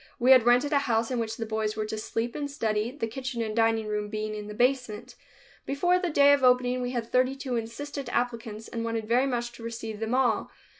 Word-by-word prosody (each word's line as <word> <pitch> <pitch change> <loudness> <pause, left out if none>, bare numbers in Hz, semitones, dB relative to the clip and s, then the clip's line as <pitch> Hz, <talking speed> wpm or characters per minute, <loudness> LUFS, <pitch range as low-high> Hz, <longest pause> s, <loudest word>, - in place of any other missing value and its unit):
We 255 +1 +4
had 255 -3 +7
rented 250 +5 +4
a 285 - +5
house 230 -3 0
in 250 - 0
which 225 -1 -3
the 225 - -3
boys 220 -1 -2
were 215 -1 -2
to 215 - -4
sleep 225 +2 -3
and 290 -1 -4
study, 220 -5 -1
the 260 -2 -4
kitchen 255 +1 -5
and 215 -1 -4
dining 225 -1 +2
room 210 0 -3
being 215 0 -3
in 210 -1 -6
the 210 - -7
basement. 250 -3 0 0.5
Before 355 +6 +2
the 360 -1 -1
day 285 -2 +6
of 280 -2 +1
opening 250 0 +3
we 245 - -2
had 240 -2 -2
thirty 255 +1 +2
two 265 -2 -4
insistent 245 +4 -5
applicants 230 -3 -3
and 230 -1 -4
wanted 225 -1 -3
very 250 +4 +3
much 240 -2 -2
to 235 -1 -12
receive 225 -2 -6
them 225 +2 -1
all. 245 -5 +1
235 Hz, 235 wpm, -27 LUFS, 220-255 Hz, 0.5 s, had